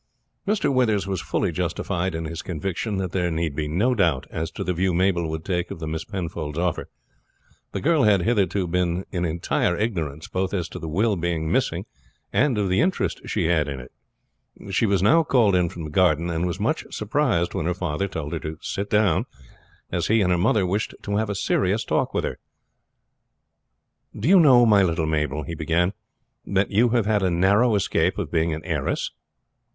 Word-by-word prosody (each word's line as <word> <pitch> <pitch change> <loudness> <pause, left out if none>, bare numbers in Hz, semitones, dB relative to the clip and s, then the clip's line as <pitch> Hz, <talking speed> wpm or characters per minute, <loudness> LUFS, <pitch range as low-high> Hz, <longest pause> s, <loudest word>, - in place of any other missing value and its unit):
Mr. 205 -8 +1
Withers 110 -7 +2
was 95 -2 -2
fully - - -1
justified 90 0 -2
in 80 0 -3
his 80 +1 -5
conviction 95 +5 -3
that 95 -2 -2
there 90 -2 0
need 80 -3 -2
be 75 0 -2
no 100 +12 +1
doubt 85 - +1
as 80 0 -3
to - - -5
the 90 - -1
view 90 +1 0
Mabel 90 -2 +1
would 80 0 -5
take 90 -2 -1
of - - -6
the 80 - -6
Miss 80 +1 -4
Penfold's 85 -6 -5
offer. 85 -2 -1 0.8
The - - -4
girl 160 0 +3
had 105 -5 +4
hitherto 100 -4 +1
been 90 +1 0
in 90 -2 -1
entire 85 +1 0
ignorance 80 -9 -3
both 95 +2 -2
as 90 -3 -2
to - - -7
the 80 - -6
will 105 +7 +1
being 80 -2 -1
missing, - - 0 0.5
and 135 -4 +2
of 100 -2 +1
the 90 +1 +2
interest 185 +3 0
she - - -1
had 80 -3 +2
in 70 -2 -4
it. 65 - -11 0.8
She 115 - +2
was 100 -2 +1
now 165 +11 +5
called 120 -10 +3
in 90 -2 +2
from 85 - -8
the 75 - -6
garden, 85 -1 +2
and 85 +2 -1
was 85 - -4
much - - 0
surprised 105 - 0
when 80 - -2
her 90 - 0
father 90 0 -2
told 80 -5 -5
her 85 - -2
to 80 0 -6
sit 100 +3 -4
down, 105 -6 +2 0.6
as - - -1
he 110 0 +3
and 90 -2 +2
her 90 - +3
mother 95 +2 +2
wished 100 +4 -2
to 100 0 -1
have 110 0 0
a 100 - -2
serious 100 +2 0
talk - - 0
with - - -1
her. - - -4 1.8
"Do 110 - -1
you 190 +2 +7
know, 130 -7 +7
my 105 -3 +5
little 85 -3 +1
Mabel," 75 -1 -1
he 85 - -6
began, 85 +4 0 0.5
"that 100 0 0
you 115 +4 +4
have 115 -2 +1
had 105 -1 +2
a 95 - +2
narrow 100 +7 +3
escape 100 - +1
of - - -4
being 80 0 +1
an 80 0 -4
heiress?" - - -2
90 Hz, 205 wpm, -24 LUFS, 80-105 Hz, 1.8 s, you